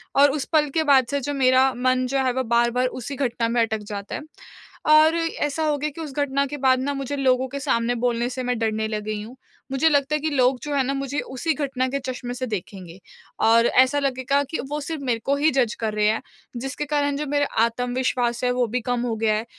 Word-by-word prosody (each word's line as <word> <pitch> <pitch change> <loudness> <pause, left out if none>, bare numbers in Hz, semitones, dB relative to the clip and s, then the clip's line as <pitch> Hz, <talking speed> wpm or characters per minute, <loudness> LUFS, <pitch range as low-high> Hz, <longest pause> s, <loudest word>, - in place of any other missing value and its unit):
और 280 0 +6
उस 280 -1 -3
पल 300 -2 +3
के 320 - +2
बाद 275 -4 +5
से 280 - 0
जो 290 +3 -3
मेरा 260 -1 +4
मन 255 0 +1
जो 275 - 0
है 255 - +2
वो 260 +1 -1
बार-बार 235 +2 +2
उसी 255 +2 -6
घटना 240 -3 -1
में 235 0 +2
अटक 220 -1 0
जाता 200 0 -5
है। - - -5 0.7
और 310 +1 +6
ऐसा 320 -2 -1
हो 300 -1 +1
गया 300 +2 -2
कि 330 - -7
उस 300 -4 -6
घटना 280 -1 +1
के 290 +2 -6
बाद 260 -2 +3
ना 285 +2 -1
मुझे 275 +1 -4
लोगों 260 -1 +2
के 280 +2 -6
सामने 240 -2 0
बोलने 240 0 0
से 255 0 -4
मैं 250 -1 -1
डरने 220 -1 0
लग 215 -1 -3
गई 215 0 -4
हूँ। 235 +4 -11 0.4
मुझे 270 +4 +3
लगता 285 0 +2
है - - 0
कि, 315 - 0
लोग 255 -3 +2
जो 295 - -3
है 275 - +3
ना 275 +2 -1
मुझे 275 +1 -3
उसी 265 +5 -2
घटना 270 -3 -1
के 275 +2 -2
चश्मे 255 -2 -5
से 255 +1 -4
देखेंगे, 190 -4 -7 0.4
और 230 +1 +5
ऐसा 260 +3 +4
लगेगा 275 0 0
कि 320 - -2
वो 295 +1 -2
सिर्फ़ 305 0 -5
मेरे 240 -3 0
को 280 - +2
ही 300 +3 +2
जज़ 250 -4 +1
कर 220 -2 -2
रहे 210 0 +1
हैं 220 +1 +1 0.4
जिसके 270 +4 -4
कारण 285 -1 0
जो 300 - -3
मेरा 285 +1 +1 0.2
आत्मविश्वास 245 0 -1
है 250 - +2
वो 250 0 +1
भी 245 +3 -2
कम 245 +1 -1
हो 240 -2 -1
गया 220 -1 +2
है 220 +2 -2
260 Hz, 245 wpm, -23 LUFS, 240-285 Hz, 0.7 s, और